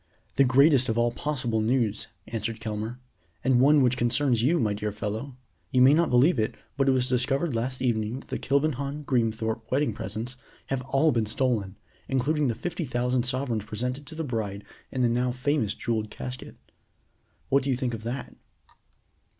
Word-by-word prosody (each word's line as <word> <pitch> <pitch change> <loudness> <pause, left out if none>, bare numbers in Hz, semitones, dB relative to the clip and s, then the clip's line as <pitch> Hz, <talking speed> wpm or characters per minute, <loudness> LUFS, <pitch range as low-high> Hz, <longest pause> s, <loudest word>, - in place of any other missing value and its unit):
"The 140 - +5
greatest 135 0 +5
of 110 - 0
all 120 0 +3
possible 125 -5 -1
news," 110 -2 0 0.2
answered 110 0 -4
Kelmare, 110 +1 -4 0.5
"and 130 -1 +4
one 145 +2 +6
which 125 0 +2
concerns 120 0 +2
you, 160 +8 +3
my 105 -5 +1
dear 105 +1 -3
fellow. 110 +6 -4 0.3
You 125 -1 +4
may 135 +2 +7
not 165 +1 +3
believe 125 +4 +4
it, 110 - 0 0.2
but 135 0 +2
it - - +6
was 130 -1 +2
discovered 135 +4 0
last 125 +3 -2
evening 115 +1 0
that - - -20
the - - -3
Kilbenham 140 +1 0
Greenthorpe 115 -2 -1
wedding 135 -3 +1
presents 120 +5 -5 0.3
have 135 -1 -1
all 145 +3 +3
been 115 -3 0
stolen, 110 -5 -1 0.3
including 145 +3 +1
the 115 - 0
fifty 175 - -4
thousand 125 -1 0
sovereigns 125 -5 -1
presented 125 +6 -4
to 160 - -9
the 160 - -3
bride 105 -7 -3 0.3
in 130 - -2
the - - +5
now 125 +2 +1
famous 125 -3 0
jeweled 110 -2 -2
casket. 125 +3 -7 0.9
What 140 +1 +4
do 140 - -3
you 130 - +1
think 125 -2 -2
of 115 - -5
that?" 120 +4 -5
125 Hz, 180 wpm, -27 LUFS, 115-135 Hz, 0.9 s, may